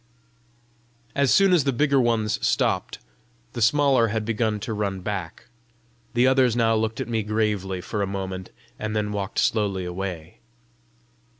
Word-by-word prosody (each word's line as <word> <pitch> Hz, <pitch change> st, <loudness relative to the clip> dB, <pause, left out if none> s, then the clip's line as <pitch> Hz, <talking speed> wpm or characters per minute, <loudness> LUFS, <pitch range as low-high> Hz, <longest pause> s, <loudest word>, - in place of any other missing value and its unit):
As 140 Hz, -1 st, +2 dB
soon 195 Hz, -1 st, +5 dB
as 170 Hz, -5 st, +4 dB
the 140 Hz, -, +1 dB
bigger 140 Hz, +1 st, +2 dB
ones 115 Hz, -3 st, 0 dB
stopped, -, -, 0 dB, 0.6 s
the 120 Hz, -, -4 dB
smaller 130 Hz, 0 st, +4 dB
had 110 Hz, 0 st, -2 dB
begun 110 Hz, -1 st, 0 dB
to 110 Hz, -, -4 dB
run 100 Hz, -3 st, -2 dB
back. 90 Hz, -4 st, -5 dB, 0.7 s
The 120 Hz, +1 st, +4 dB
others 130 Hz, -3 st, +3 dB
now 115 Hz, -1 st, +3 dB
looked 110 Hz, 0 st, -1 dB
at -, -, -3 dB
me 115 Hz, -2 st, -1 dB
gravely 105 Hz, -3 st, -1 dB
for 105 Hz, +3 st, -3 dB
a 100 Hz, -, 0 dB
moment, 95 Hz, -1 st, -5 dB, 0.3 s
and 110 Hz, 0 st, -3 dB
then 105 Hz, -1 st, -1 dB
walked 100 Hz, -1 st, -4 dB
slowly 100 Hz, -4 st, +1 dB
away. 90 Hz, -2 st, -6 dB
110 Hz, 155 wpm, -24 LUFS, 100-120 Hz, 0.7 s, soon